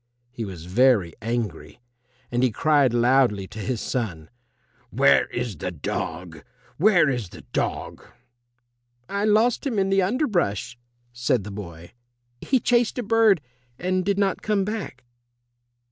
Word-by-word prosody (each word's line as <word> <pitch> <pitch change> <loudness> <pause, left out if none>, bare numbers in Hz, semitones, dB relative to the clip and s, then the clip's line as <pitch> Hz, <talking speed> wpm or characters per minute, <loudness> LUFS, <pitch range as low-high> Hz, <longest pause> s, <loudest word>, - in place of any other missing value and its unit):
He 120 -2 -5
was 90 -5 -8
very 100 -2 +3
angry, 115 -6 -4 0.5
and 120 0 0
he 130 - +4
cried 145 +2 +3
loudly 120 -4 +3
to 105 +1 -9
his 120 +2 -2
son, 90 -13 -4 0.6
"Where - - +4
is 120 -7 -4
the 90 - -3
dog? 80 0 -5 0.3
Where 180 -2 +4
is 125 -8 -2
the - - -12
dog?" - - -2 1.1
"I 200 +1 -1
lost 220 +3 +3
him 235 -6 -2
in 195 0 +1
the 195 0 +4
underbrush," 185 - 0 0.4
said 120 -2 0
the 105 - -8
boy; 85 -4 -9 0.5
"he 260 - +1
chased 240 +1 +1
a 245 - -1
bird 220 -5 +4 0.4
and 185 +1 -1
did 200 +1 0
not 195 -2 0
come 205 -3 0
back." 205 - -5
125 Hz, 140 wpm, -24 LUFS, -, 1.1 s, he